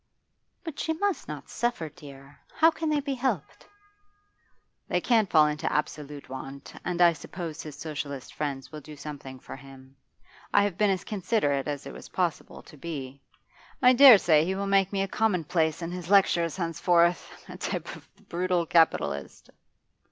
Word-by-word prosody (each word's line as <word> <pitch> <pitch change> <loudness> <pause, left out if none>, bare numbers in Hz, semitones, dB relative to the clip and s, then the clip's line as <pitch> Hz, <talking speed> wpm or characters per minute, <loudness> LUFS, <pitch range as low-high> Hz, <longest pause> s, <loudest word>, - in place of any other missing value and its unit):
'But 325 -4 -7
she 320 - 0
must 400 +3 -2
not - - -7
suffer, 240 -9 -2
dear. 140 -3 -14 0.2
How 325 +1 +5
can 320 0 -3
they 300 -1 +1
be 280 -1 -3
helped?' 245 - -3 1.2
'They - - +1
can't 225 -5 +2
fall 155 -2 +6
into 150 0 -1
absolute 150 -1 -3
want. 135 +1 -8
And 180 -1 -3
I 170 -1 +6
suppose 165 0 -7
his 150 -2 -9
Socialist 145 -3 -6
friends 140 -3 -4
will 155 -1 -8
do 150 +2 -11
something 140 -3 -8
for - - -9
him. 135 0 -15 0.6
I 205 - +6
have 200 -3 -1
been 210 +2 +2
as 190 -2 0
considerate 185 - -1
as 145 -1 -4
it - - -8
was - - -11
possible 175 -3 -3
to 150 - -15
be. 140 -3 -7 0.6
I 250 0 +6
dare 255 -3 +10
say 155 -5 +4
he 185 +3 -1
will 200 +1 -2
make 195 -1 +2
me 195 -1 0
a - - -2
commonplace 175 -6 0
in 170 - -4
his 180 -1 -6
lectures 180 -4 +3
henceforth, 170 0 +1 0.2
a - - -9
type - - -4
of - - -16
the - - -25
brutal 180 0 -1
capitalist. 160 - +1
170 Hz, 175 wpm, -27 LUFS, 145-195 Hz, 1.2 s, dare